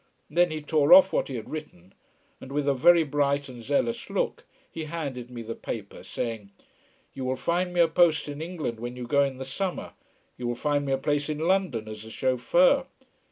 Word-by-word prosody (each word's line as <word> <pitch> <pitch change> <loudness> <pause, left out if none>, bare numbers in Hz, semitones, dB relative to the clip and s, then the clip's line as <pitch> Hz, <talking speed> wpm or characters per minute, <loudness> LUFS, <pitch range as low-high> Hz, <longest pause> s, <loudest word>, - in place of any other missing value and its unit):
Then 175 +3 +3
he 155 -1 -5
tore 150 - +4
off 280 0 +8
what - - +1
he 135 - -5
had 110 -3 -7
written, 100 - -8 0.5
and 130 - -10
with 145 0 -1
a 140 - +4
very 170 +6 +5
bright 145 -1 0
and 125 -2 -10
zealous 145 - -1
look - - -2 0.3
he 160 -1 -5
handed 140 -7 -5
me 120 -2 -7
the 115 +1 -5
paper 105 -4 -7
saying: 115 -4 -5 0.6
"You 135 - -6
will 130 0 -1
find 175 +6 -1
me 175 -1 +2
a 170 - +6
post 160 -2 +3
in 145 +1 -6
England, 160 -9 -4
when 120 +1 -5
you 125 -1 -6
go 140 +3 +3
in 135 -2 -2
the 130 - -6
summer? 185 +7 -4 0.5
You 125 - -3
will 120 - -1
find 145 +2 0
me - - -1
a 135 - +2
place 145 +2 -1
in 150 - -2
London 160 - 0
as 110 0 -8
a 110 - -10
chauffeur 170 - +2
145 Hz, 210 wpm, -27 LUFS, 125-165 Hz, 0.6 s, off